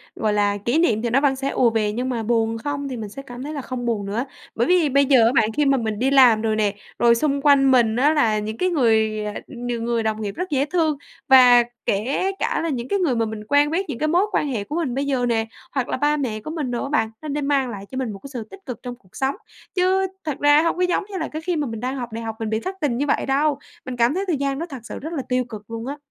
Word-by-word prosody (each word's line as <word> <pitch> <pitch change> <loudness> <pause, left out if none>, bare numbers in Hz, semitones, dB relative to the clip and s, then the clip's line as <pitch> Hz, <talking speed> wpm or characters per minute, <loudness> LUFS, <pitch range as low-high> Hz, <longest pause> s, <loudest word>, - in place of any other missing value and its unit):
gọi 215 -1 0
là, 205 0 +1
kỷ 235 +9 0
niệm 225 -10 +2
thì 240 - -1
nó 270 +4 +3
vẫn 275 -2 +2
sẽ 270 +1 -2
ùa 240 -2 +3
về 215 -2 0
nhưng 250 +4 -2
mà 230 -3 -2
buồn 225 0 +1
không 285 +3 -4
thì 250 - -5
mình 215 -2 -6
sẽ 275 - -8
cảm 245 -1 -9
thấy 300 +2 -5
là 280 - -4
không 250 -1 -5
buồn 215 -4 -1
nữa. 225 +6 -2 0.3
Bởi 235 +2 +1
vì 355 -5 +3
bây 280 +1 +4
giờ 255 -5 +5
á 235 - +4
bạn 215 - +4
khi 295 - +3
mà 275 -1 +3
mình 220 -2 -2
đi 265 +2 +1
làm 245 -5 +6
rồi 220 -1 0
nè, 210 -2 +1 0.3
rồi 235 -1 +5
xung 280 +2 0
quanh 275 -2 +5
mình 230 -3 +4
á 290 +5 +3
là 220 -8 +2
những 215 +1 -5
cái 365 - +1
người, 220 -7 +2
à, 210 - -4
n 245 -2 -7
người 235 -1 -1
đồng 220 0 -1
nghiệp 200 -1 -4
rất 365 +1 -4
dễ 280 -1 +1
thương 315 -4 0 0.3
và 250 -2 +8 0.2
kể 265 - 0
cả - - 0
là 330 - -1
những 250 -3 -3
cái 400 - 0
người 295 -9 +1
mà 225 0 +1
mình 215 -1 -6
quen 290 +1 +3
biết, 380 +4 0
những 250 - -4
cái 310 - +1
mối 355 +6 +3
quan 295 - 0
hệ 225 -7 -2
của 295 - -6
mình 310 -8 -1
bây 280 +1 -1
giờ 260 -3 0
nè, 225 -2 +1 0.3
hoặc 265 -3 -1
là - - -1
ba 295 +2 +2
mẹ 230 -6 -2
của 310 - -7
mình 295 -6 -3
đồ 240 - -2
á 275 - -4
bạn, 255 -7 +1
nó 310 - -7
đã 290 +1 -2
mang 275 -3 +1
lại 200 -3 -7
cho 260 - -5
mình 250 -5 -2
một 195 - -8
cái 275 - -11
sự 235 -3 -4
tích 390 - -11
cực 250 -5 -6
trong 245 -1 -6
cuộc 190 -7 -25
sống. 270 +1 -1 0.4
Chứ 380 +1 +2 0.2
thật 300 -3 -3
ra 290 +1 +5
hông 335 +1 0
có - - -1
giống 360 +2 +1
như 380 - -4
là 315 - -2
cái 310 +1 -6
khi 355 0 -1
mà 295 -3 -1
mình 225 -1 -5
đang 255 +3 -3
học 240 -3 -5
đại 230 +1 -5
học 225 -1 -4
mình 220 -1 -3
bị 220 0 0
thất 380 +9 -5
tình 250 -5 0
như 285 - 0
vậy - - +1
đâu, 285 +1 +1 0.3
mình 255 -1 -5
cảm 235 +4 +3
thấy 385 +2 -1
thời 325 -6 +1
gian 275 0 -1
đó 335 - -3
thật 270 -3 -7
sự - - -7
rất 320 +4 -6
là 280 - -2
tiêu 250 0 +1
cực 215 -1 -9
luôn 230 +1 -5
á. 285 +1 -4
255 Hz, 310 wpm, -22 LUFS, 225-290 Hz, 0.4 s, và